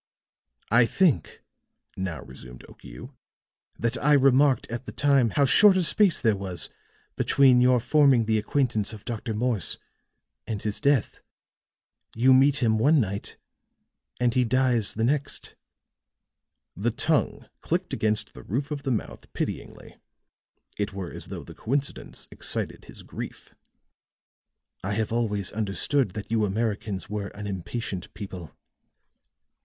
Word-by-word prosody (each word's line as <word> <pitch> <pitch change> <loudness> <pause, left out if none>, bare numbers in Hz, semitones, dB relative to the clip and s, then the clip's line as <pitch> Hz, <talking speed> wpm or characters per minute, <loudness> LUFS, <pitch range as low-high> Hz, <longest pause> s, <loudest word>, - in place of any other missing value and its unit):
"I 120 +1 +5
think," 155 - +1 0.5
now 90 -8 -4
resumed 60 0 -12
Okiu, - - -12 0.6
"that 115 0 -1
I 150 +1 +5
remarked 135 0 +4
at 120 +2 -5
the - - -5
time 140 -5 +3
how 140 +6 +2
short 195 +7 +6
a 185 - +2
space 195 0 +3
there 110 -3 +2
was 95 -3 -4 0.5
between 130 -3 +4
your 125 0 +4
forming 130 -1 +4
the 110 0 +1
acquaintance 115 -3 0
of 105 - -11
Dr. 115 -1 -4
Morse 115 -4 0 0.7
and 105 -3 -4
his 105 -1 -2
death. 140 -5 +1 1.0
You 130 +3 +5
meet 135 +1 +4
him 110 -2 +2
one 145 +6 +4
night 100 -3 -3 0.8
and 120 -1 +2
he 125 -1 +3
dies 125 -2 +1
the 110 - -1
next." 145 +4 -1 1.2
The 105 +7 0
tongue 145 +6 0
clicked - - -2
against 110 -1 -1
the - - -11
roof 135 +8 -3
of 145 -1 -3
the 135 - -3
mouth 115 -4 -4
pityingly; - - -6 0.8
it 100 0 -2
were 95 -3 -6
as - - -9
though - - -7
the - - -12
coincidence 140 +4 -4
excited - - -3
his - - -13
grief. - - -9 1.3
"I - - -2
have 110 +1 -1
always 105 -5 0
understood 105 +2 0
that 105 0 -7
you 110 -1 +2
Americans 105 -1 -2
were 105 -1 -4
an 105 0 -7
impatient 95 0 -5
people. 95 -7 -8
115 Hz, 140 wpm, -26 LUFS, 105-135 Hz, 1.3 s, short